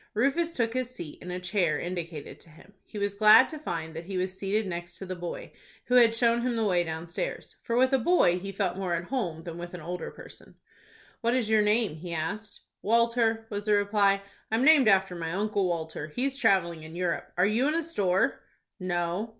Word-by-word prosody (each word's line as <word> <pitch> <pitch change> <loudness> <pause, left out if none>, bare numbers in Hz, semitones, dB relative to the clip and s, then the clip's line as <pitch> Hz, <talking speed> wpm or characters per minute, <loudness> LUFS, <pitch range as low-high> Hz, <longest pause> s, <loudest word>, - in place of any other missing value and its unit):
Rufus 280 +9 +1
took 230 -4 0
his 255 -1 -2
seat 165 -12 -9
in 180 - -8
a 180 0 -3
chair 180 -2 0
indicated 170 -4 -6
to - - -16
him. 165 +5 -18
He 215 - -10
was 205 -1 -1
glad 215 +4 +7
to 310 - -7
find 160 - -5
that 165 +1 -6
he 190 0 -4
was 185 +1 -2
seated 200 +3 -1
next 175 -1 -6
to 195 - -7
the 185 0 -5
boy, 175 -1 -6 0.3
who 250 - -2
had 235 -2 +6
shown 235 0 +2
him 245 0 -1
the 225 - 0
way 180 -4 +2
downstairs, 165 - -5
for 230 - -2
with 260 +2 +3
a 270 - +4
boy 230 - +3
he 195 +2 -6
felt 195 -2 -2
more 180 -3 -1
at 170 - -3
home 180 -12 -2
than 170 -1 -7
with 175 +1 -7
an 175 - -8
older 175 +3 -5
person. - - -13 0.7
"What 235 +1 +1
is 230 -4 0
your 215 -1 +5
name?" 210 -5 +1
he 170 +1 -6
asked. 200 +8 -5 0.2
"Walter," 230 0 +2
was 205 0 -4
the 210 - +3
reply. 200 -1 +2 0.3
"I'm 225 +4 +1
named 300 -5 +7
after 190 -2 +4
my 165 -2 -4
Uncle 200 0 0
Walter. 160 -3 -3
He's 260 - -2
travelling 170 - +2
in 160 +1 -10
Europe. 175 -1 -2
Are 180 - +4
you 225 +7 +2
in 305 - 0
a 335 - 0
store?" 195 - 0 0.4
"No." 175 +3 -2
195 Hz, 215 wpm, -28 LUFS, 175-230 Hz, 0.7 s, glad